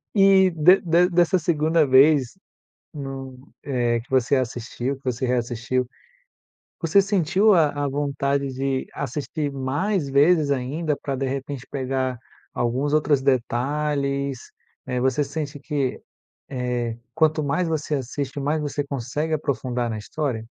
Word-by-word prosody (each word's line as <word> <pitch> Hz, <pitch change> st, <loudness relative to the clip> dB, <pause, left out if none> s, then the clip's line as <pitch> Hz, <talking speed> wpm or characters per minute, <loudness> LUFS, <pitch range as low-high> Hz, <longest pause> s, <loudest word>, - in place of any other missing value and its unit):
E 195 Hz, -2 st, +6 dB
de 165 Hz, +4 st, +5 dB
de 175 Hz, +1 st, +3 dB
dessa 175 Hz, +1 st, +3 dB
2º 160 Hz, -1 st, +2 dB
vez, 135 Hz, +3 st, +5 dB, 0.6 s
no 135 Hz, -2 st, -6 dB, 0.3 s
eh, 120 Hz, -4 st, 0 dB
que 120 Hz, -, -17 dB
você 130 Hz, +1 st, +2 dB
assistiu, 125 Hz, +1 st, -3 dB
que 135 Hz, -, -23 dB
você 125 Hz, 0 st, -1 dB
reassistiu, 125 Hz, +1 st, -1 dB, 0.9 s
você 175 Hz, +4 st, +4 dB
sentiu 195 Hz, +2 st, +3 dB
a 160 Hz, -4 st, +4 dB, 0.2 s
a -, -, 0 dB
vontade 140 Hz, 0 st, -1 dB
de 135 Hz, 0 st, -2 dB
assistir 145 Hz, +2 st, -3 dB
mais 145 Hz, +5 st, -1 dB
vezes 145 Hz, +2 st, +4 dB
ainda, 145 Hz, +4 st, -1 dB
pra, 140 Hz, -, -4 dB
de 135 Hz, 0 st, -2 dB
repente, 135 Hz, 0 st, -5 dB
pegar 130 Hz, -2 st, -2 dB, 0.4 s
alguns 130 Hz, +5 st, -1 dB
outros 150 Hz, -2 st, +3 dB
detalhes, 140 Hz, +1 st, -1 dB, 0.4 s
né. 125 Hz, -1 st, -2 dB
Você 130 Hz, +3 st, +1 dB
sente 145 Hz, 0 st, -5 dB
que, 140 Hz, -3 st, -2 dB, 0.5 s
eh, 125 Hz, -3 st, -2 dB, 0.2 s
quanto 155 Hz, -1 st, +2 dB
mais 165 Hz, +5 st, 0 dB
você 155 Hz, -2 st, -1 dB
assiste, 135 Hz, +2 st, -4 dB
mais 150 Hz, +3 st, 0 dB
você 145 Hz, -1 st, -2 dB
consegue 140 Hz, +4 st, -3 dB
aprofundar 125 Hz, -5 st, -2 dB
na 110 Hz, -, -4 dB
história? 115 Hz, -1 st, -3 dB
140 Hz, 135 wpm, -23 LUFS, 130-155 Hz, 0.9 s, E